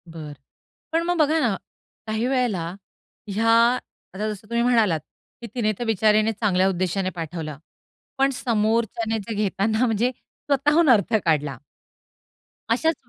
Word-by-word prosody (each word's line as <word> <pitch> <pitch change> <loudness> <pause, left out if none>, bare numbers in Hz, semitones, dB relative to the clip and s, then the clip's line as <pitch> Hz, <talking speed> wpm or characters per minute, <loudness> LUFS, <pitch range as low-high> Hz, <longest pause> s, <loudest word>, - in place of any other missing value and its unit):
बरं, 160 -3 -8 0.6
पण 330 +1 +1
मग 350 +1 0
बघा 310 0 +3
ना, 235 -9 +1 0.5
काही 220 +2 -1
वेळेला 245 -10 0 0.6
ह्या 215 +3 0 0.6
आता 210 +3 -2
जसं 210 0 -7
तुम्ही 235 0 +1
म्हणालात 225 -9 +3 0.4
की 235 - -6
तिने 220 -3 +1
तर 240 - -2
बिचारीने 215 0 +3
चांगल्या 190 -3 +2
उद्देशाने 185 +1 -1
पाठवलं, 160 -3 -5 0.6
पण 270 0 +3
समोरच्याने 225 -2 0
जे 225 - -3
घेताना 215 +3 +1
म्हणजे 230 +2 +1
स्वतःहून 295 +5 0
अर्थ 225 -2 +4
काढला. 150 -5 +1 1.1
अशाच 320 +8 +2
220 Hz, 130 wpm, -23 LUFS, 190-245 Hz, 1.1 s, अर्थ